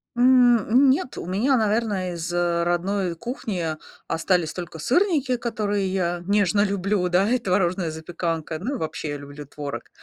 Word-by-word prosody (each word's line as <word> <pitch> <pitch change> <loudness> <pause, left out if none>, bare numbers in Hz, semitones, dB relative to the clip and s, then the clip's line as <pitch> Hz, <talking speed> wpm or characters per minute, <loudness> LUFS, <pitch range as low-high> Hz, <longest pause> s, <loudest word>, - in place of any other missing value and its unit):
М, 245 -1 +6
м, 260 +4 +5
нет, 260 - -2
у - - -5
меня, 225 +9 +2
наверно, 210 -4 0
из, 170 0 -4
э, 175 -1 +1
родной 175 +1 0
кухни 210 - -4 0.4
остались 165 -1 0
только 175 -2 -7
сырники, 280 - +1
которые 210 -4 -1
я 175 -2 -1
нежно 205 -1 +3
люблю, 195 -2 0
да, 180 +3 +3
и 250 - +3
творожная 185 -3 0
запеканка, 160 0 -4
ну 275 - -3
и - - -3
вообще 155 -3 -4
люблю 145 +1 -10
творог. 145 0 -7
190 Hz, 155 wpm, -24 LUFS, 170-225 Hz, 0.4 s, М